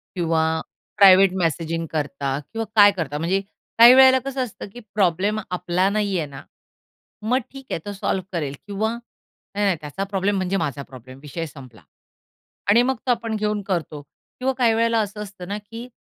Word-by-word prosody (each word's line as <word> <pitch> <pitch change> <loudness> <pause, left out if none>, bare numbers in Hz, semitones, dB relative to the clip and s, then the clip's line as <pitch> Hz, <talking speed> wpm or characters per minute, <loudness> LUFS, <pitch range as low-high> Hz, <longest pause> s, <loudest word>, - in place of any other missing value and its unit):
किंवा 165 -3 +1 0.5
private 195 -2 +7
messaging 165 -1 -1
करता 140 -3 -2
किंवा 225 0 -3
काय 205 -1 +8
करता? 160 -7 -4
म्हणजे 175 +5 0 0.4
काही 235 +2 +10
वेळेला 260 0 +7
कसं 275 -1 -2
असतं 225 -4 -8
की 245 - -9 0.2
प्रॉब्लेम 200 +2 +1
आपला 180 +1 0
नाही 200 -2 0
आहे 160 -3 -2
ना, 140 -1 -10 0.8
मग 230 +4 +1
ठीक 270 -1 -11
आहे - - -1
तो 205 - -5
सॉल्व्ह 190 -1 -2
करेल 145 -5 -3
किंवा 210 +2 -1 0.6
नाही, 205 0 +1
नाही 190 -4 +2
त्याचा 150 +6 -5
प्रॉब्लेम 200 0 -1
म्हणजे 190 +1 -1
माझा 145 -5 -3
प्रॉब्लेम 130 0 -13
विषय 150 +3 -5
संपला. 130 -7 -13 0.9
आणि 225 +4 +6
मग 265 +1 0
तो - - +4
आपण 230 -2 -2
घेऊन 210 -1 -1
करतो 165 -6 -3
किंवा 255 - -6
काही 235 -3 +3
वेळेला 230 0 +2
असं 210 0 -3
असतं 195 -3 -10
ना 200 +2 -3
की 225 +3 -9
195 Hz, 175 wpm, -22 LUFS, 165-215 Hz, 0.9 s, काही